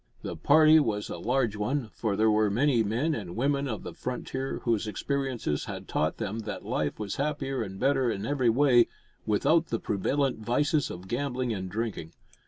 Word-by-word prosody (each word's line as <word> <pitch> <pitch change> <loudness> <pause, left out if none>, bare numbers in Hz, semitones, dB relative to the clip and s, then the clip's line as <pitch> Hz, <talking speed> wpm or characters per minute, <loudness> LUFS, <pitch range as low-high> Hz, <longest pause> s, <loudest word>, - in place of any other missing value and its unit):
The - - -4
party 155 0 +6
was 105 -7 -1
a - - -5
large 120 -2 0
one, 110 +2 -2
for 110 -4 -1
there 110 +1 +3
were 105 0 +3
many 120 +3 +2
men 120 +10 0
and 95 - -5
women 140 +3 +1
of 110 -5 -4
the - - -7
frontier 130 +1 -4
whose 115 -2 0
experiences 130 - -2
had - - -7
taught 80 +1 0
them 105 +2 -3
that 105 -2 -6
life 75 -2 -1
was 105 -2 -4
happier 135 -2 -1
and 95 -3 -6
better 135 -2 +2
in 100 -2 -3
every 130 -3 +2
way 120 0 +5 0.4
without 160 +11 +3
the 115 - -2
prevalent 135 +6 0
vices 145 +6 +1
of 90 +2 -8
gambling 125 0 -1
and 95 -2 -4
drinking. 105 -6 -4
120 Hz, 185 wpm, -28 LUFS, 105-140 Hz, 0.4 s, party